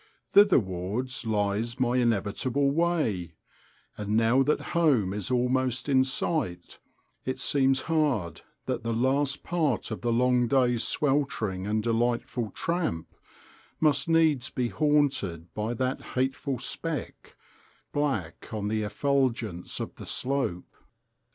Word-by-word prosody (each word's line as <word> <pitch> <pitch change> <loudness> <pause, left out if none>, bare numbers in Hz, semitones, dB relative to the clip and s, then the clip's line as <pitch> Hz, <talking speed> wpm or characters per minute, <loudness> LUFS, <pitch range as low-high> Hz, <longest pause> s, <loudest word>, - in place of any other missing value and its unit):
Thitherwards 120 - +2
lies 110 +3 -1
my 125 0 +2
inevitable 120 +4 +1
way; 140 - 0 0.6
and 105 +1 -1
now 115 +4 +4
that 150 +3 +2
home 135 - +3
is 105 0 -4
almost 125 +1 +1
in 130 -2 +4
sight 130 - -2 0.4
it 130 0 -3
seems 135 -1 +2
hard 140 - 0 0.2
that 130 -2 -2
the 115 0 -2
last 135 +4 +1
part 155 -10 -1
of 110 - -4
the 120 - 0
long 125 +1 +3
day's 125 -2 +2
sweltering 135 - 0
and 110 +1 0
delightful 115 0 0
tramp 165 - -2 0.7
must 150 -1 +2
needs 160 -6 +3
be 125 -2 -2
haunted 135 - 0
by 110 +3 -2
that 130 +2 -1
hateful 130 +1 -1
speck, 150 +2 -4 0.6
black 135 - -2
on 105 -2 -2
the 110 0 0
effulgence 115 -5 -1
of - - -5
the - - -9
slope. 130 -9 -2
125 Hz, 120 wpm, -27 LUFS, 110-140 Hz, 0.7 s, now